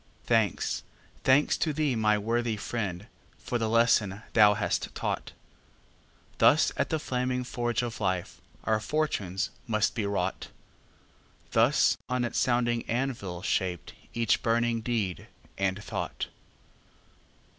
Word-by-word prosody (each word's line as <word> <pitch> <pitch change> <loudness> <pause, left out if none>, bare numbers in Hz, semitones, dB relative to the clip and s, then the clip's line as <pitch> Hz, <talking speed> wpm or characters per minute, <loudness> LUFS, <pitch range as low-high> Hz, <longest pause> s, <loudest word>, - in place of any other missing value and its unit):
Thanks, 110 -6 +1 0.4
thanks 135 +3 +4
to 155 - +1
thee, 145 -3 +1
my 105 -1 +3
worthy 115 +1 0
friend, 100 -4 -3 0.3
For 120 - -3
the 110 -1 0
lesson 110 -3 +3
thou 105 -2 +6
hast 100 0 -2
taught! - - -3 1.1
Thus - - +5
at - - 0
the 160 - +1
flaming 125 -3 -1
forge 120 -1 -1
of 115 -2 -5
life 95 -3 -2 0.2
Our 110 -1 +1
fortunes 105 - -1 0.2
must 110 -1 +1
be 105 -4 -1
wrought; 95 -2 -2 1.0
Thus 120 +6 +4
on 125 -1 0
its 120 - -1
sounding 120 -1 +1
anvil 115 -8 -2
shaped 90 -4 -1 0.2
Each 115 -2 +1
burning 115 0 +1
deed 110 -6 -2 0.3
and 95 +1 -1
thought. - - -4
115 Hz, 125 wpm, -28 LUFS, 100-120 Hz, 1.1 s, thou